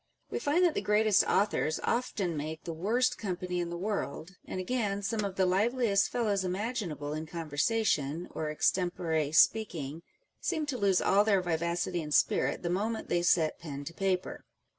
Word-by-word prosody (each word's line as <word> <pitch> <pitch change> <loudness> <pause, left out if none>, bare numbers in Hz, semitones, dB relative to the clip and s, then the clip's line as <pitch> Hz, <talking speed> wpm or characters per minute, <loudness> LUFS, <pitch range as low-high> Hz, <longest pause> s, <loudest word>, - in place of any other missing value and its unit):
We - - -2
find 325 +6 +2
that 340 - +3
the - - -1
greatest 210 -1 +4
authors 195 -6 +1
often 210 -8 -1
make 155 +2 -5
the 165 - -5
worst 225 +10 +1
company 180 -3 -3
in 175 -1 -2
the 170 - -4
world; 180 -4 -3
and - - -5
again, 200 -1 -1
some 215 +1 -1
of 195 -2 -3
the 190 - +2
liveliest 205 +2 +2
fellows 210 -5 0
imaginable 185 - -3
in 155 +1 -4
con 165 0 -6
versation 165 -3 +1
or 155 - -3
extempore 160 -2 0
speaking, 160 -5 +2 0.4
seem 315 -4 -1
to 280 -4 -3
lose 195 -3 +3
all 200 +1 +4
their 205 -2 +3
vivacity 170 +1 -1
and 150 -1 -2
spirit - - +2
the 170 - -1
moment 220 +5 -2
they 175 - +2
set 165 -2 +2
pen 145 -4 -6
to 165 - -6
paper. 185 0 -2
185 Hz, 175 wpm, -30 LUFS, 165-215 Hz, 0.4 s, greatest